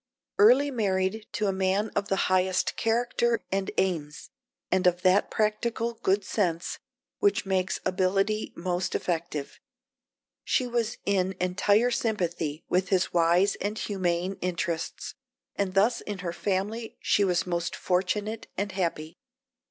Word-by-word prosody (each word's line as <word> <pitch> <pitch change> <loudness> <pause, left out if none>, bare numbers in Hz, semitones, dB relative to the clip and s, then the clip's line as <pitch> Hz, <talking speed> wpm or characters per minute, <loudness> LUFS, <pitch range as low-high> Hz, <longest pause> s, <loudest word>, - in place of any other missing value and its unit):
Early 255 +7 +6
married 205 -2 0
to 210 0 -1
a 195 - +1
man 190 +3 0
of 200 0 0
the 195 - +1
highest 185 0 +1
character 235 0 +1
and 195 0 0
aims, 165 -3 -2 0.4
and 185 0 +3
of 180 0 +2
that 185 +2 +4
practical 225 +2 0
good 200 -2 0
sense 175 -5 -1 0.4
which 405 - +2
makes 190 -1 0
ability 195 +3 +1
most 180 +1 -2
effective, 165 -4 -3 0.8
she 255 - +1
was 235 -2 -1
in 190 -1 +1
entire 205 +6 +2
sympathy 175 -10 -1
with 180 +1 +1
his 185 -2 +1
wise 175 +3 +4
and 210 +2 -2
humane 185 -2 -1
interests, 170 -2 -3 0.4
and 195 -1 -2
thus 215 +5 +3
in 205 -2 -5
her 170 - -2
family 210 +5 -2
she 205 - +2
was 180 -3 +1
most 175 -1 -2
fortunate 205 +4 -1
and 200 +1 -1
happy. 165 -4 -3
190 Hz, 135 wpm, -27 LUFS, 180-210 Hz, 0.8 s, Early